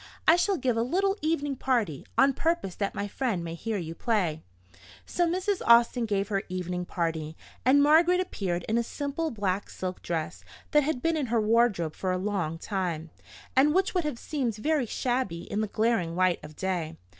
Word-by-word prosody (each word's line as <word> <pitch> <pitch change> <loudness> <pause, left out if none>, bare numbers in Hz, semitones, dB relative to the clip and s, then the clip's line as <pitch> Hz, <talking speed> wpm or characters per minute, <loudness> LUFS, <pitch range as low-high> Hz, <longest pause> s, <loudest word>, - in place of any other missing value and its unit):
I 320 - +8
shall 365 +2 +1
give 250 -5 0
a - - +2
little 385 +11 +1
evening 290 -3 0
party, 235 - -1
on 275 +1 +5
purpose 330 - -1
that 200 +1 -3
my 200 - -2
friend 210 -5 -2
may 165 -1 -5
hear 215 +5 -3
you 165 -3 -5
play." 175 -6 0 0.6
So 350 -1 +1
Mrs. 375 +3 -1
Austin 235 0 +5
gave 200 -1 0
her 195 -2 0
evening 180 -1 -3
party, 160 -3 -3 0.3
and 280 +3 +6
Margaret 335 +5 +5
appeared 185 - -2
in 225 +2 +2
a - - +1
simple 285 +6 -3
black 200 -4 -2
silk 185 -1 -5
dress 165 -2 -3 0.3
that 295 - +5
had 285 -3 -2
been 330 0 +2
in 285 -4 -1
her 235 0 +1
wardrobe 215 -7 +2
for 185 - -2
a 185 - 0
long 185 -5 -2
time, 170 -4 -3 0.4
and 290 +4 +4
which 380 0 +2
would 360 -2 +1
have 300 -5 -3
seemed 250 -5 -2
very 290 +3 0
shabby 245 -9 -1
in 205 - -2
the 215 - -1
glaring 210 -6 0
light 185 -1 +2
of 150 0 -11
day. 175 -4 -2
225 Hz, 190 wpm, -28 LUFS, 180-285 Hz, 0.6 s, I